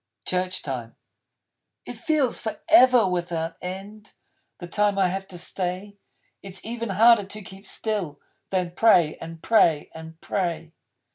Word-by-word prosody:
Church 185 0 -1
Time 125 -5 -5 0.9
It - - -6
feels 305 -7 0
Forever 245 - +4
without 170 -2 -2
End, 200 +3 -8 0.4
The 175 - -8
time 205 +3 +1
I 190 -2 +3
have 195 +1 -4
to 180 - -8
stay. 185 +3 -3 0.5
It's 195 -1 -9
even 230 0 -4
harder 220 +2 +5
to 210 +2 -8
keep 190 +1 -11
still 195 -10 -2 0.3
Than 180 -2 -1
pray 175 -5 +4
and 165 0 -10
pray 165 -9 +3
and 160 0 -11
pray. 170 -4 -3
190 Hz, 135 wpm, -24 LUFS, 170-210 Hz, 0.9 s, harder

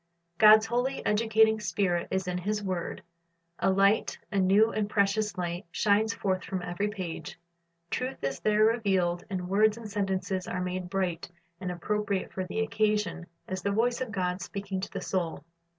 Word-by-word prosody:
God's 215 0 +8
holy, 245 +4 -1
educating 220 0 +3
Spirit 180 -5 0
is 190 -1 -1
in 180 0 -1
His 210 +3 -2
word. 185 -3 -3 0.6
A - - +2
light, 195 +3 +3
a 200 - +1
new 200 +4 +4
and 210 -1 -1
precious 205 0 +1
light, 175 +1 -3
shines 210 +4 +2
forth 190 -4 -1
from 185 -2 -4
every 180 +4 -2
page. 185 -6 -6 0.5
Truth 255 - -3
is 135 0 -2
there 215 0 +3
revealed, 190 -6 +1
and 185 -2 -3
words 210 +3 +3
and 230 -2 -7
sentences 190 -2 -2
are 180 - -3
made 180 0 -3
bright 180 -4 -2 0.3
and 185 -1 -4
appropriate 200 +2 -2
for 185 - -2
the 190 +4 -3
occasion, 210 -5 0 0.2
as 185 0 -4
the 200 - -1
voice 235 +5 +1
of 255 -4 -3
God 180 -3 -1
speaking 195 +1 -4
to - - -4
the - - -4
soul. 170 -6 -2
195 Hz, 170 wpm, -29 LUFS, 185-215 Hz, 0.6 s, God's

